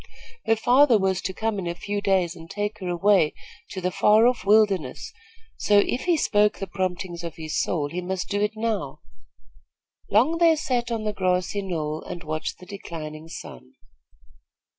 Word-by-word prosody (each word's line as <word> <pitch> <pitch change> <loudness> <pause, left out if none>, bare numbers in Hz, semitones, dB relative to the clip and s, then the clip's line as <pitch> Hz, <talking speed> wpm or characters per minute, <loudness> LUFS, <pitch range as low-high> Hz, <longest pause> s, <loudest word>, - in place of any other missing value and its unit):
Her 225 - +4
father 245 +2 +5
was 190 -2 0
to 190 - -3
come 220 +1 -2
in 180 - -4
a 170 - -3
few 205 +3 -3
days 185 -3 +1
and 165 -1 -12
take 205 +2 -3
her 185 - -5
away 180 -2 +3 0.3
to 190 - -5
the 180 0 -1
far 210 +3 +5
off 250 0 +2
wilderness, 205 -3 +2 0.4
so, 205 - +3
if 245 - -3
he 350 -2 +3
spoke 210 -6 +2
the 195 - -4
promptings 185 -2 -4
of 170 -2 -6
his 155 -2 -2
soul, 150 -5 -1
he 175 +5 -4
must 185 0 -3
do 205 0 -1
it 210 +1 0
now. 215 -11 -3 1.1
Long 265 +11 +3
they 335 -2 +5
sat 245 -5 -1
on 225 -2 -2
the 210 0 -2
grassy 185 +1 0
knoll 160 -5 -3
and 175 - -8
watched 155 0 -4
the 180 - -13
declining 160 -5 -8
sun. 65 - -10
195 Hz, 180 wpm, -24 LUFS, 175-215 Hz, 1.1 s, father